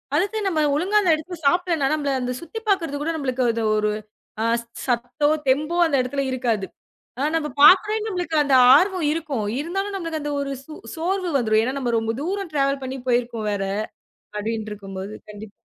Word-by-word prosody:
அதுக்குன்னு 405 Hz, +5 st, 0 dB
நம்ம 315 Hz, -3 st, 0 dB
ஒழுங்கா 390 Hz, +7 st, +2 dB
அந்த 360 Hz, -5 st, +3 dB
இடத்தல 345 Hz, +3 st, -7 dB
சாப்பிடலாம். 345 Hz, -1 st, +1 dB
ஆனா -, -, 0 dB
நம்மள 285 Hz, -2 st, -1 dB
அந்தச் 250 Hz, 0 st, -3 dB
சுத்தி 340 Hz, +7 st, -7 dB
பாக்குறது 335 Hz, -7 st, +1 dB
கூட 315 Hz, -, -2 dB
நம்மளுக்கு 260 Hz, -4 st, -1 dB
அந்த 230 Hz, 0 st, -2 dB
ஒரு 210 Hz, 0 st, +1 dB
ஒரு 215 Hz, -, -5 dB, 0.6 s
ஸ் -, -, -17 dB, 0.2 s
சத்தோ, 245 Hz, +3 st, 0 dB, 0.2 s
தெம்போ 300 Hz, +6 st, +1 dB
அந்த 320 Hz, -4 st, +1 dB
இடத்துல 275 Hz, +2 st, -2 dB
இருக்காது. 235 Hz, -6 st, -1 dB, 0.5 s
ஆனா, 280 Hz, +3 st, 0 dB
நம்ம 315 Hz, -2 st, 0 dB
பாக்குறேன்ன்னு 425 Hz, +7 st, +6 dB
நம்மளுக்கு 355 Hz, -4 st, -3 dB
அந்த 275 Hz, -2 st, +3 dB, 0.2 s
ஆர்வம் 365 Hz, +1 st, +2 dB
இருக்கும். 300 Hz, -9 st, -3 dB
இருந்தாலும் 390 Hz, +6 st, -3 dB
நமக்கு 330 Hz, -4 st, -4 dB
அந்த 295 Hz, 0 st, -3 dB
ஒரு 280 Hz, 0 st, -3 dB
சு 315 Hz, -, -10 dB, 0.2 s
சோர்வு 360 Hz, +2 st, -1 dB
வந்துரும். 220 Hz, -3 st, +2 dB
ஏன்னா 255 Hz, +3 st, -1 dB
நம்ம 245 Hz, -3 st, -1 dB
ரொம்ப 225 Hz, 0 st, -2 dB
தூரம் 380 Hz, +1 st, -3 dB
டிராவல் 275 Hz, -1 st, +1 dB
பண்ணி 260 Hz, +1 st, -4 dB
போயிருக்கோம் 240 Hz, -3 st, 0 dB
வேற. 200 Hz, -1 st, -1 dB, 0.7 s
அப்படின்னு 220 Hz, 0 st, -3 dB
இருக்கும்போது, 195 Hz, 0 st, -7 dB, 0.2 s
கண்டிப் 210 Hz, 0 st, -10 dB
285 Hz, 180 wpm, -23 LUFS, 240-345 Hz, 0.7 s, பாக்குறேன்ன்னு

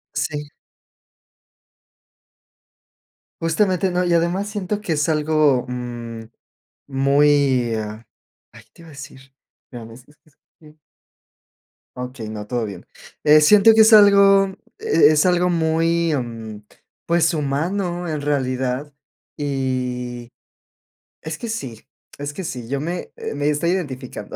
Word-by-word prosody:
Sí. 150 Hz, -1 st, -3 dB, 2.9 s
Justamente, 185 Hz, +2 st, +1 dB
¿no? 180 Hz, +1 st, 0 dB
Y, 175 Hz, -, +1 dB
además, 175 Hz, +4 st, 0 dB
siento 205 Hz, 0 st, -3 dB
que 170 Hz, -6 st, -2 dB
es 150 Hz, +2 st, 0 dB
algo, 150 Hz, -4 st, +2 dB
mm, 120 Hz, -2 st, -6 dB, 0.7 s
muy 140 Hz, -3 st, +2 dB
ah, 110 Hz, +1 st, -6 dB, 0.5 s
ay, -, -, -15 dB
¿te 170 Hz, -, -18 dB
iba 165 Hz, -, -14 dB
a -, -, -13 dB
decir?, 135 Hz, -1 st, -11 dB, 0.5 s
ya 120 Hz, -3 st, -9 dB
ves, 115 Hz, +3 st, -13 dB
es 145 Hz, -, -22 dB
es 155 Hz, -1 st, -28 dB, 0.2 s
que 155 Hz, 0 st, -18 dB, 1.2 s
Okey, 125 Hz, -2 st, -7 dB
no, 105 Hz, -1 st, -7 dB
todo 120 Hz, -2 st, -2 dB
bien. 100 Hz, -4 st, -9 dB, 0.4 s
Eh, 150 Hz, +1 st, +6 dB
siento 210 Hz, +8 st, +6 dB
que 220 Hz, -, +7 dB
es 220 Hz, +1 st, +6 dB
algo, 200 Hz, -1 st, +6 dB, 0.3 s
e 435 Hz, -, +4 dB
es 155 Hz, +3 st, +3 dB
algo 180 Hz, 0 st, +2 dB
muy, 165 Hz, 0 st, +1 dB
mm, 115 Hz, -4 st, -6 dB, 0.4 s
pues, 170 Hz, 0 st, +2 dB
humano 175 Hz, +5 st, -2 dB
en 155 Hz, -2 st, -3 dB
realidad. 130 Hz, 0 st, -2 dB, 0.5 s
Y 125 Hz, -4 st, -3 dB, 0.9 s
es 155 Hz, 0 st, -5 dB
que 235 Hz, -, -6 dB
sí 130 Hz, -, -6 dB, 0.3 s
es 145 Hz, +1 st, -5 dB
que 185 Hz, +3 st, -6 dB
sí, 125 Hz, -7 st, -6 dB
yo 140 Hz, 0 st, -2 dB
me 175 Hz, +4 st, -5 dB, 0.2 s
me 145 Hz, +1 st, 0 dB
estoy 160 Hz, +4 st, 0 dB
identificando. 135 Hz, -9 st, -5 dB
150 Hz, 130 wpm, -21 LUFS, 125-175 Hz, 2.9 s, que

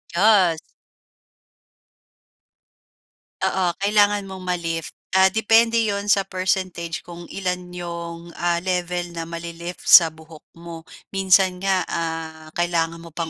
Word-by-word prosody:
Yes. 185 Hz, -4 st, +4 dB, 2.9 s
Oo, 190 Hz, -1 st, 0 dB
kailangan 205 Hz, 0 st, +2 dB
mong 190 Hz, -1 st, -9 dB
ma-lift, 170 Hz, -3 st, -3 dB, 0.2 s
ah, 190 Hz, 0 st, +6 dB
depende 225 Hz, +2 st, +3 dB
'yon 205 Hz, -2 st, -1 dB
sa 195 Hz, -1 st, +3 dB
percentage 185 Hz, -2 st, -2 dB
kung 175 Hz, 0 st, -10 dB
ilan 180 Hz, -2 st, -4 dB
'yong, 170 Hz, -1 st, -7 dB
ah, 175 Hz, 0 st, 0 dB
level 180 Hz, -1 st, -2 dB
na 165 Hz, -1 st, -6 dB
mali-lift 170 Hz, +1 st, -7 dB
sa 165 Hz, -2 st, +8 dB
buhok 160 Hz, 0 st, -15 dB, 0.2 s
mo. 170 Hz, -1 st, -9 dB, 0.3 s
Minsan 190 Hz, -1 st, +3 dB
nga, 190 Hz, -2 st, +1 dB
ah, 160 Hz, -1 st, -5 dB
kailangan 170 Hz, -1 st, 0 dB
mo 165 Hz, -1 st, -13 dB
pang 165 Hz, 0 st, -3 dB
175 Hz, 115 wpm, -22 LUFS, 170-190 Hz, 2.9 s, sa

